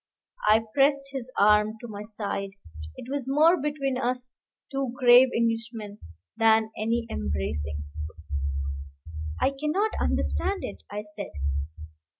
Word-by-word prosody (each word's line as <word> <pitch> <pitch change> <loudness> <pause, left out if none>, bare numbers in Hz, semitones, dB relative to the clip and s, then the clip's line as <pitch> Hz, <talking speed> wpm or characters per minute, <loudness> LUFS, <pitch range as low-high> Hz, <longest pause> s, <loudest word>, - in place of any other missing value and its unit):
I 220 +1 +6
pressed 275 0 +3
his 260 -2 -5
arm 210 +1 +5
to 240 - -8
my 205 -2 -7
side: 205 -2 -4 0.4
it - - -8
was 270 -1 -3
more 315 +5 +5
between 275 -3 -1
us 250 0 -2 0.2
two 270 -3 -2
grave 250 0 +8
Englishmen 225 -2 -2 0.4
than 220 -1 +4
any 230 +2 0
embracing. 75 +1 -2 1.6
"I - - +3
cannot 305 +10 0
understand 395 0 0
it," - - -6
I 205 +1 -4
said. 210 -1 -7
235 Hz, 120 wpm, -27 LUFS, 210-270 Hz, 1.6 s, grave